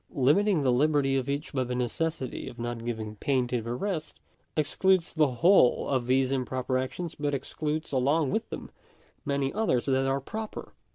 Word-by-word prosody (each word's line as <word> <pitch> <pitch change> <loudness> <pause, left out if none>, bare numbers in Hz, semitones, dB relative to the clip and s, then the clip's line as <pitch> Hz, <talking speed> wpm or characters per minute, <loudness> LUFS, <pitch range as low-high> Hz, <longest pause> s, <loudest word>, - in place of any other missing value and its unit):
Limiting 155 +6 +3
the 130 - +3
liberty 140 +1 +2
of 135 0 -1
each 145 +3 -3
by 130 -2 +1
the 125 0 -3
necessity 130 +3 -2
of - - -13
not 120 -1 -4
giving 110 -2 -4
pain 130 +1 +1
to 125 -2 0
the 115 +2 -4
rest, 170 -1 -3 0.4
excludes 175 +4 +2
the 155 -2 +4
whole 135 +2 +4
of 130 -3 0
these 130 +1 +2
improper 130 0 -1
actions, 160 +6 -4
but 145 -1 -1
excludes 150 +3 -3
along 140 +2 +2
with 220 - -1
them - - -7 0.5
many 140 -1 0
others 205 - +1
that 135 -1 +2
are 135 +1 +1
proper. 215 +10 -6
135 Hz, 175 wpm, -28 LUFS, 125-155 Hz, 0.5 s, the